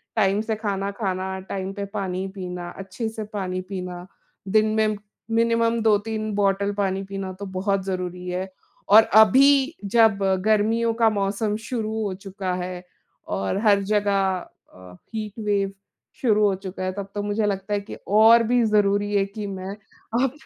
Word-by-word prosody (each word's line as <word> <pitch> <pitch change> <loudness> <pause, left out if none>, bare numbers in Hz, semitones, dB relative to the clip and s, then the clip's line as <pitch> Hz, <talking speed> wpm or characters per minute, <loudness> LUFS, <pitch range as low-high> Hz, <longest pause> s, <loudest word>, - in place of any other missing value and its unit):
Time 200 -1 +2
से 220 0 -2
खाना 200 -2 -2
खाना, 190 -2 -3
टाइम 190 0 -5
पे 200 0 -4
पानी 190 -1 -2
पीना, 180 -2 -5
अच्छे 195 +4 -5
से 220 -1 -6
पानी 185 -2 -2
पीना। 180 -2 -5 0.4
दिन 215 +2 +3
में 215 -1 +1 0.3
मिनिमम 230 0 +2
2-3 215 0 +1
बॉटल 200 0 +1
पानी 195 -1 0
पीना 195 -1 -5
तो 200 - -5
बहुत 190 +1 -1
ज़रूरी 180 -1 -4
है। 185 +1 -3 0.4
और 220 - +10 0.2
अभी 275 - +5 0.2
जब 225 -3 +6 0.3
गर्मियों 225 +2 +2
का 230 -1 +3
मौसम 205 +1 -1
शुरू 220 -3 -2
हो 200 -2 -2
चुका 190 -1 -5
है 180 0 -5 0.5
और 95 - -1
हर 200 -1 +5
जगह 205 -1 +2 0.6
अ, 90 -1 -13 0.2
हीट 215 0 -5
वेव 200 -1 +1 0.5
शुरू 215 -4 +3
हो 200 - +1
चुका 190 -1 -7
है, 185 - -1
तब 200 0 -5
तो 205 - -1
मुझे 205 +1 0
लगता 200 0 -2
है 205 - +1
कि - - -9
और 225 +3 +6
भी 245 0 +3
ज़रूरी 205 -1 +2
है 195 -1 +3
कि 205 +1 -6
मैं 190 0 -6 0.5
अब 265 - +1
200 Hz, 165 wpm, -24 LUFS, 190-220 Hz, 0.6 s, और